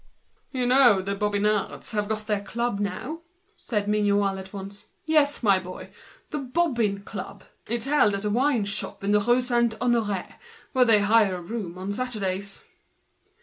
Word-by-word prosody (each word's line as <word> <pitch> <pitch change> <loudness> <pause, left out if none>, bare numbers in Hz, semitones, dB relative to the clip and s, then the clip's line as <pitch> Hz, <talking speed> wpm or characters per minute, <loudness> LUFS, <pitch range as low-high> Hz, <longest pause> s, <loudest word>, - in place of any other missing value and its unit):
"You 255 -2 -1
know 245 -5 +6
the 200 +1 -2
Bobbin 205 0 -1
fellows 210 -1 -1
have 210 -1 -1
got 215 -1 -2
their 210 -2 0
club 235 +1 -2
now," 205 - -4 0.3
said 210 -3 -3
Mignot, 205 -1 +2
all 195 -1 0
at 190 0 -10
once. 200 0 -9 0.2
"Yes, 300 -4 +2
my 200 -3 +5
boy, 185 0 -9 0.4
the 300 - -2
'Bobbin 245 -8 0
Club.' 200 -2 -8 0.2
It's 235 +1 -1
held 275 -8 +3
at 200 +1 -4
a 210 - 0
tavern 245 -1 +2 0.4
in 200 - +1
the 210 - +5
Rue 240 +3 +3
Saint 235 -2 +1
Honoré, 220 -6 -1 0.3
where 255 -2 +4
they 220 -3 +5
hire 205 -2 +4
a 180 - -6
room 185 -3 -5
on 190 +2 -4
Saturdays." 200 -5 -3
210 Hz, 170 wpm, -25 LUFS, 200-240 Hz, 0.4 s, know